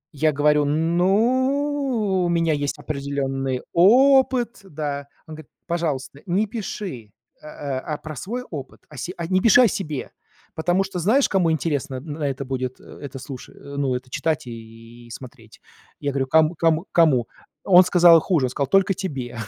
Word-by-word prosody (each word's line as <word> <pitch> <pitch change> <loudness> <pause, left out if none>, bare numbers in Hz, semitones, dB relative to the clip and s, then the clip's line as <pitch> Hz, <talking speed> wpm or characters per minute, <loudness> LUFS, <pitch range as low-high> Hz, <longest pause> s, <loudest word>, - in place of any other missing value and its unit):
Я 155 +2 +2
говорю: 150 +1 +2
"Ну, 220 - +1
у 175 - 0
меня 165 -2 +1
есть 145 0 -2
определённый 140 -3 -3
опыт", 250 +4 +4
да, 145 -5 -5 0.2
он 160 - -10
говорит: 155 -2 -13 0.2
"Пожалуйста, 150 -5 -3
не 195 +5 +1
пиши, 195 - -6 0.3
э, - - -16
а, 145 0 -5
про 155 -1 -9
свой 240 - -5
опыт, 140 -4 -8
о 150 - -13
се 175 +9 -5 0.2
не 185 0 +2
пиши 230 +2 +6
о - - +6
себе, 155 -9 -4 0.4
потому 175 +4 +1
что 190 -2 -5
знаешь, 230 - +3
кому 180 -4 +1
интересно 145 -4 -2
н 130 +5 -7
на 145 -2 -2
это 135 0 -5
будет 130 -1 -4
это 140 -2 -10
слуша, 135 -1 -9
ну, 140 -2 -3
это 125 0 -7
читать 155 -1 -1
и 115 0 -12
смотреть?" 120 -2 -12 0.4
Я 145 - -2
говорю: 135 -1 -1
"Ком 160 +3 +3
ком 165 +2 +1
кому?" 140 -9 +3 0.4
Он 185 -1 +7
сказал 175 -2 +6
хуже, 160 -9 +1
он - - -1
сказал: 140 0 -2
"Только 195 +5 +3
тебе, 135 - -5
155 Hz, 165 wpm, -22 LUFS, 135-185 Hz, 0.4 s, Он